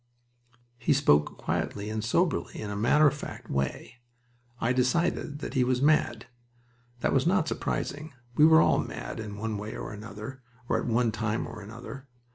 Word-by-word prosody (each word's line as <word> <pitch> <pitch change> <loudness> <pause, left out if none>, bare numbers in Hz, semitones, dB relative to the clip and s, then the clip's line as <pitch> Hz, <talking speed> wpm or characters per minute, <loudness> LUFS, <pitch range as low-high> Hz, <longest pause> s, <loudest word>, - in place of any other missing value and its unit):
He 150 - +3
spoke 75 - +3
quietly 105 +1 -2
and 110 -1 -2
soberly, 165 +8 0
in 105 -1 -4
a - - -3
matter 120 +9 +4
of 145 - +5
fact 150 - -8
way. 70 - -2 0.6
I 120 +2 +1
decided 145 +3 +1
that - - -5
he 130 -2 +3
was 125 0 +1
mad. 140 -5 +2 0.8
That - - +1
was 135 +3 +3
not 180 -3 +3
surprising. 150 0 -3 0.2
We 150 +5 +6
were 160 0 +7
all - - +4
mad, - - -5
in 105 -2 -6
one 110 -1 -3
way 105 +1 -6
or - - -6
another 110 +5 -8 0.3
or - - +1
at - - -4
one 115 0 +2
time 110 0 -1
or 115 -2 -8
another. 120 +6 -9
120 Hz, 175 wpm, -28 LUFS, 110-145 Hz, 0.8 s, were